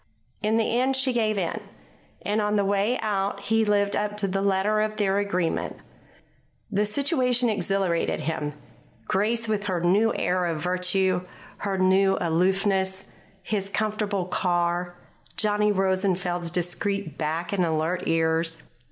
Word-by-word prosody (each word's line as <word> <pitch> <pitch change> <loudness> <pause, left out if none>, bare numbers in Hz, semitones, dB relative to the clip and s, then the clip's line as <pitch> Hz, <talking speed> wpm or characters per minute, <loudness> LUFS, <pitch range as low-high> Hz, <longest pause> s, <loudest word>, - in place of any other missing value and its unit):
In 215 +1 +1
the 230 +1 +1
end 265 +1 +2
she 265 -1 +2
gave 215 -3 +1
in. 175 -4 -2 0.6
And 210 +1 0
on 210 0 0
the 200 -1 +2
way 200 +5 +1
out 200 -1 -1
he 225 +2 +2
lived 205 -1 +2
up 210 0 -2
to 205 -1 +1
the 195 +1 -1
letter 200 +2 +2
of 215 0 -1
their 200 -1 +2
agreement. 185 -4 -1 1.0
The 205 +1 +1
situation 250 -1 +2
exhilarated 195 -3 0
him: 150 -2 -3 0.5
Grace 225 +4 0
with 210 -2 -1
her 185 -3 -1
new 195 +6 +3
air 180 0 0
of 165 -2 -2
virtue, 180 +2 +1 0.4
her 195 -1 -2
new 190 +1 +3
aloofness; 190 +3 +1 0.4
his 195 0 -2
comfortable 210 -2 -1
car; 175 0 -1 0.4
Johnny 210 0 +2
Rosenfeld's 185 -3 0
discreet 180 0 -2
back 165 +3 -2
and 190 -2 +2
alert 165 +2 -1
ears. 165 0 +1
195 Hz, 140 wpm, -25 LUFS, 180-210 Hz, 1.0 s, new